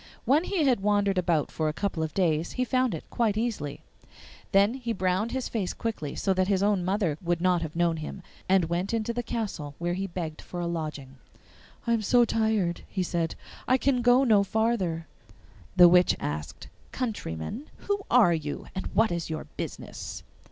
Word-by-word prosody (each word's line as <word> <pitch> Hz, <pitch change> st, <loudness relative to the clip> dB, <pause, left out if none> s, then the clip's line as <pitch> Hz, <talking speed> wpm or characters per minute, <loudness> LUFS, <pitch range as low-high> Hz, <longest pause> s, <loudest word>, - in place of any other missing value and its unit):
When 300 Hz, +6 st, +3 dB
he 375 Hz, -6 st, 0 dB
had 255 Hz, -5 st, +3 dB
wandered 200 Hz, -1 st, +2 dB
about 170 Hz, -4 st, +1 dB
for 155 Hz, -1 st, 0 dB
a -, -, -3 dB
couple 185 Hz, -2 st, -2 dB
of 160 Hz, -1 st, -3 dB
days 165 Hz, -4 st, +1 dB
he 255 Hz, -, 0 dB
found 255 Hz, -5 st, +1 dB
it 155 Hz, -, -9 dB
quite 220 Hz, -3 st, +1 dB
easily. 215 Hz, -12 st, -3 dB, 0.2 s
He -, -, -27 dB, 0.4 s
then 205 Hz, +7 st, +3 dB, 0.2 s
browned 185 Hz, +4 st, 0 dB
his 260 Hz, -1 st, -2 dB
face 205 Hz, -6 st, -2 dB
quickly, 210 Hz, -11 st, -4 dB
so 195 Hz, -, +1 dB
that 185 Hz, 0 st, +1 dB
his 195 Hz, -1 st, +2 dB
own 205 Hz, -3 st, +2 dB
mother 185 Hz, -5 st, 0 dB
would 175 Hz, -1 st, 0 dB
not 180 Hz, -1 st, +2 dB
have 160 Hz, -1 st, -5 dB
known 170 Hz, -1 st, +2 dB
him, 155 Hz, +4 st, -7 dB, 0.3 s
and 190 Hz, -2 st, +4 dB
went 175 Hz, +6 st, -1 dB
into 225 Hz, +1 st, -1 dB
the 240 Hz, -, -1 dB
castle, 190 Hz, -12 st, -4 dB
where 175 Hz, +1 st, -1 dB
he 195 Hz, +2 st, -2 dB
begged 165 Hz, -4 st, -5 dB
for 175 Hz, -, -7 dB
a 175 Hz, -, -1 dB
lodging. 155 Hz, -5 st, -4 dB, 0.7 s
'I 235 Hz, -, +2 dB
am 230 Hz, -, +1 dB
so 240 Hz, +3 st, +4 dB
tired,' 220 Hz, -6 st, 0 dB
he 190 Hz, -, -2 dB
said, 170 Hz, -2 st, -1 dB, 0.3 s
'I 255 Hz, -, +4 dB
can 260 Hz, -1 st, +1 dB
go 245 Hz, +2 st, +5 dB
no 215 Hz, -6 st, +5 dB
farther.' 195 Hz, -6 st, 0 dB, 0.7 s
The 180 Hz, -1 st, +9 dB
witch 180 Hz, +1 st, +5 dB
asked, 75 Hz, +1 st, -5 dB, 0.2 s
'Countryman, 220 Hz, -, -4 dB, 0.2 s
who 405 Hz, 0 st, +1 dB
are 230 Hz, -8 st, +6 dB
you, 155 Hz, -3 st, -4 dB
and 190 Hz, -, -4 dB
what 220 Hz, -1 st, +4 dB
is 170 Hz, -1 st, -3 dB
your 155 Hz, -1 st, -3 dB
business? -, -, -6 dB
190 Hz, 190 wpm, -27 LUFS, 165-225 Hz, 0.7 s, The